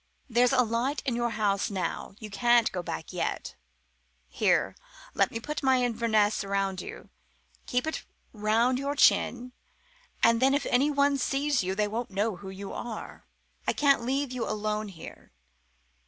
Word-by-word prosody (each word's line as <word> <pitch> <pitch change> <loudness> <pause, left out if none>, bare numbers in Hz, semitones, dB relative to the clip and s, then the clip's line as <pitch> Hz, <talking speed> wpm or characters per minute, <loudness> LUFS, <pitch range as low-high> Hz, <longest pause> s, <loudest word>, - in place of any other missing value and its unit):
There's 245 0 +3
a 255 -2 +4
light 240 +5 -1
in 250 - 0
your 240 0 0
house 205 -3 0
now. 190 0 -4
You 215 -2 -8
can't 240 +3 +3
go 180 - -3
back 165 0 -6
yet. 180 - -3 0.7
Here, - - +1 0.4
let - - +2
me 230 - -5
put 300 +6 -4
my 260 -2 +3
Inverness 220 -4 +1
round 195 -1 -1
you. - - -10 0.6
Keep 250 +3 0
it 315 - -2
up - - -16 0.3
round 225 +4 +2
your 280 +1 -2
chin, 250 -3 +3 0.7
and 230 +1 +5
then 270 +1 +4
if 285 - -1
anyone 280 +2 +3
sees 275 +1 +1
you 190 +1 -2
they 210 +1 +1
won't 230 +3 -3
know 200 +1 -1
who 195 0 -9
you 195 +1 -7
are. 235 -2 -7 0.4
I - - +3
can't 280 -3 +3
leave 270 +2 -1
you 250 -2 -3
alone 215 0 -2
here. 180 -5 -12
230 Hz, 165 wpm, -28 LUFS, 205-255 Hz, 0.7 s, and